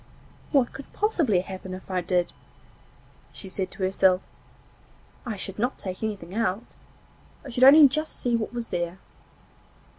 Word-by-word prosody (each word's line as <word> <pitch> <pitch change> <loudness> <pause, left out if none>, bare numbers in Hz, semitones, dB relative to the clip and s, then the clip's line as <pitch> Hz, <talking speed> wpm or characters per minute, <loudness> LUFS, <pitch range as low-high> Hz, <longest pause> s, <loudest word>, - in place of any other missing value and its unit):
'What 270 -5 +2
could 275 - -10
possibly 320 - +1
happen 190 0 -7
if 185 +1 -11
I 185 -1 0
did?' 175 0 0 1.0
she 195 - -9
said 185 0 -3
to 190 - -7
herself. 185 0 +3 1.0
'I 225 - -2
should 195 0 -4
not 245 +4 0
take 185 -1 -6
anything 200 -5 -4
out. 220 -1 -1 0.8
I - - -7
should 245 +2 +1
only 285 +2 +10
just 305 +4 -3
see 240 -1 0
what 225 -2 -2
was 235 -1 -5
there. 175 +1 -3
200 Hz, 150 wpm, -26 LUFS, 185-245 Hz, 1.0 s, only